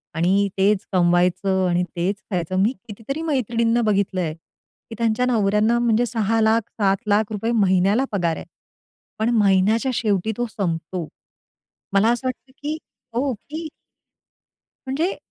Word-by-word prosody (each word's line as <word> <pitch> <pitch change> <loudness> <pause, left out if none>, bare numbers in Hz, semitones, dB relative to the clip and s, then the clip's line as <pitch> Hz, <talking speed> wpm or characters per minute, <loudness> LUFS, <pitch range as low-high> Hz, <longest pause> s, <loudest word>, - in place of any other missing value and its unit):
आणि 190 +5 +2
तेच 200 +1 +2
कमवायचं 180 +2 +2
आणि 175 +1 +2
तेच 180 +4 0 0.2
खायचं. 180 0 -2
मी 225 +5 +2
कितीतरी 225 +8 -5
मैत्रिणींना 235 -6 +1
बघितलंय, 185 -5 0
की 165 +7 -17
त्यांच्या 230 +1 +1
नवऱ्यांना 220 0 +2
म्हणजे 240 0 +2
₹6,00,000 225 0 +2
रुपये, 210 -1 -4
₹7,00,000 205 +2 +1
रुपये 220 +2 -2
महिन्याला 200 +3 +3
पगार 175 -5 0
आहे. - - -8 0.7
पण 220 +2 +1
महिन्याच्या 210 +5 +3
शेवटी 215 -2 0
तो 240 - 0
संपतो. 170 -4 -3 0.9
मला 200 +3 +4
असं 240 +2 -1
वाटतं, 255 +1 -6
की 300 +2 -2 0.4
हो. 260 +3 0
की 310 +8 -7 1.2
म्हणजे 310 +8 -1
210 Hz, 130 wpm, -22 LUFS, 190-235 Hz, 1.2 s, मला